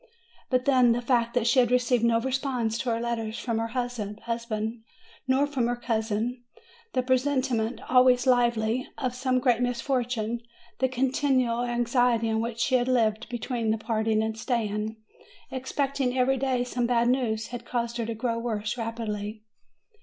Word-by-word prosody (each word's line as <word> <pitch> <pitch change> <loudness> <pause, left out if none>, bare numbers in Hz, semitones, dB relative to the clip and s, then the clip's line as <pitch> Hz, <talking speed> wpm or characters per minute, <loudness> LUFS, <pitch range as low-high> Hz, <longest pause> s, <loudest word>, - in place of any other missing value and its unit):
But 255 -1 +1
then, 255 -4 +5
the 240 - -1
fact 235 -1 +1
that 245 -2 +2
she 235 +2 +4
had 245 -2 +4
received 250 -1 +2
no 230 -1 +4
response 255 -3 -1
to 250 - -2
her 230 0 0
letters 230 -1 -3
from 230 -2 -2
her 225 - -1
husband, 230 -1 -3 0.5
nor 265 +2 +3
from 270 -5 -1
her 245 - 0
cousin, 230 0 -2 0.5
the 255 - +1
presenti 260 0 +1
ment, 225 +2 -2
always 250 0 +5
lively, 240 -1 +2
of 255 -2 -2
some 255 0 0
great 245 -2 +2
misfortune, 240 -2 -1 0.4
the 260 +1 +2
continual 255 -2 +1
anxiety 240 -1 +2
in 220 0 +1
which 230 0 -3
she 260 - +1
had 245 -1 +3
lived, 230 -3 +1
between 240 -1 -2
the 220 - +2
parting 220 0 0
and 220 0 -3
staying, 220 -3 -1 0.6
expecting 265 0 -1
every 260 +1 +3
day 260 -1 0
some 245 -1 -1
bad 235 -1 +2
news, 230 -3 0
had 245 -1 -6
caused 235 -1 -2
her 230 - -1
to 230 - -3
grow 230 +1 -1
worse 220 0 -3
rapidly. 215 -2 -4
240 Hz, 165 wpm, -27 LUFS, 225-255 Hz, 0.6 s, then